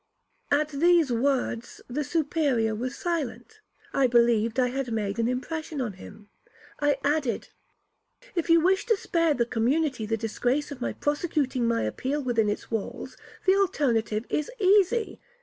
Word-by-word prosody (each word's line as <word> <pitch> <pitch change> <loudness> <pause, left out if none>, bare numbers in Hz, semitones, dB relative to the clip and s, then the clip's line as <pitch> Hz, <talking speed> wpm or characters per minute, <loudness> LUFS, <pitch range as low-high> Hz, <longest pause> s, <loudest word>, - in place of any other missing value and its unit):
At 295 +1 +2
these 325 0 +3
words 245 -1 -1
the 285 +5 -2
Superior 285 -7 0
was 245 +4 -4
silent. 335 - -4 0.3
I 270 -2 +3
believed 235 -1 +3
I 250 -1 +3
had 260 -1 -3
made 210 -1 -2
an 230 - +2
impression 305 +4 -3
on 240 -6 -2
him. 205 +3 -13 0.5
I 290 -1 +2
added, 285 -4 0 0.8
'If 340 -3 -2
you 330 0 +6
wish 380 +5 +2
to 450 -3 +3
spare 330 -5 +1
the 235 - +1
community 245 +1 0
the 225 +1 0
disgrace 245 +6 -1
of 265 -3 -8
my - - -2
prosecuting 290 -5 -1
my 230 0 +1
appeal 265 - -2
within 230 -4 +1
its 205 - -4
walls, 220 -3 -4 0.3
the 380 - +6
alternative 240 - +1
is 300 - -1
easy. 410 +2 +2
270 Hz, 150 wpm, -26 LUFS, 230-315 Hz, 0.8 s, you